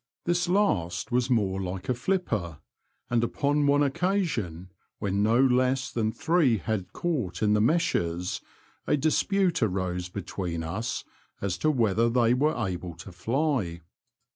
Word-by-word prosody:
This 175 0 +1
last 105 - +1
was 125 +1 +1
more 100 -6 +1
like 90 0 -5
a 125 - +2
flipper, 115 - -1 0.5
and 120 -1 +2
upon 145 +4 +1
one 145 +1 +4
occasion, 140 - -1 0.3
when 100 -1 -1
no 110 +3 +3
less 130 0 +2
than 110 -2 0
three 160 -1 +2
had 105 -2 -3
caught 135 - -2
in 105 -1 +4
the 105 - +3
meshes, 90 - 0 0.5
a 150 - +3
dispute 175 +5 +1
arose 90 -4 -1
between 90 -3 -4
us 95 +8 -3 0.4
as 100 -3 -1
to 155 - +2
whether 115 -4 +2
they 120 0 +3
were 150 +4 +1
able 90 -2 -5
to 95 +3 -10
fly. 110 - -1
115 Hz, 140 wpm, -27 LUFS, 95-145 Hz, 0.5 s, one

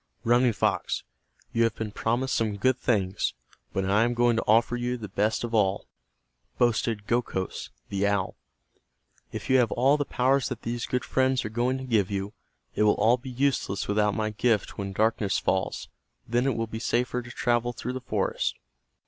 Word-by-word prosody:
"Running 120 +1 +4
Fox, - - 0 0.5
you 115 - +1
have 115 -1 +2
been 110 -2 -4
promised 120 +5 -1
some 110 -3 0
good 130 +5 +2
things, 100 -7 0 0.4
but 95 0 -1
I 100 +3 +3
am 120 +1 0
going 120 0 +3
to - - +1
offer 115 +3 +4
you 120 +1 -2
the 110 -3 -7
best 105 +4 0
of 120 -1 -4
all," 100 -3 +2 0.7
boasted 115 -3 +1
Gokhos, 115 -5 -2 0.2
the 100 0 0
owl. 100 -2 0 1.0
"If - - -6
you 130 0 +5
have 120 -3 +2
all 135 +4 +3
the 145 - 0
powers 130 +1 +1
that 125 -3 -6
these 120 0 -3
good 125 -1 -1
friends 130 -2 +1
are - - -2
going 120 +4 0
to 130 - -6
give 110 -7 +1
you, 100 0 -3 0.4
it - - -1
will 105 -1 +5
all 115 +4 +4
be 130 +1 -9
useless 130 -6 0
without 105 0 +2
my 110 -1 -1
gift 110 0 0
When 100 -1 -4
darkness 110 0 +1
falls 95 0 -1 0.4
then 120 +3 +1
it 135 - +1
will 115 - 0
be 110 0 -6
safer 120 +2 0
to 120 - -11
travel 120 0 0
through 125 +1 -5
the 130 - -5
forest. 125 - -1
115 Hz, 190 wpm, -27 LUFS, 105-125 Hz, 1.0 s, you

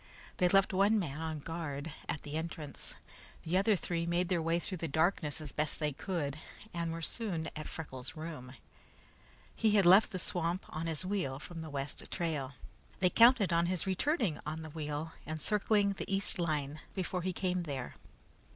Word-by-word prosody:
They 180 - +4
left 195 +1 +4
one 200 +3 +4
man 160 -6 -2
on 160 -2 -3
guard 155 -2 -4 0.2
at 160 - -2
the 145 - -7
entrance. 160 -2 -5 0.5
The 165 +3 -1
other 200 +3 +4
three 170 -2 -2
made 175 +1 +1
their 175 -3 +2
way 165 +1 +2
through 180 +1 -4
the 165 - -2
darkness 160 0 +1
as 150 -3 -7
best 155 0 0
they 150 -2 +1
could, 150 -3 -2 0.3
and 170 -1 -1
were 165 0 -5
soon 175 -6 -1
at 155 - -5
Freckles' 130 -2 -5
room. 155 -6 -7 1.0
He 215 -2 +3
had 200 -3 +5
left 190 +5 +8
the 195 - -4
swamp 175 0 -1
on 160 +2 -3
his 165 +2 -1
wheel 185 -9 -1
from 165 +3 -7
the 160 - -6
west 140 -1 -4
trail. 150 -6 -2 0.4
They 180 -1 +3
counted 230 -6 +6
on 170 +1 +3
his 180 -2 0
returning 195 - +1
on 155 +1 -4
the 155 - -8
wheel 150 0 -4
and 155 0 -3
circling 205 +2 +2
the 195 - -5
east 195 -1 +2
line 150 -3 -1 0.2
before 185 -1 -1
he 185 +2 -1
came 180 0 0
there. 140 -6 -4
165 Hz, 185 wpm, -33 LUFS, 155-185 Hz, 1.0 s, left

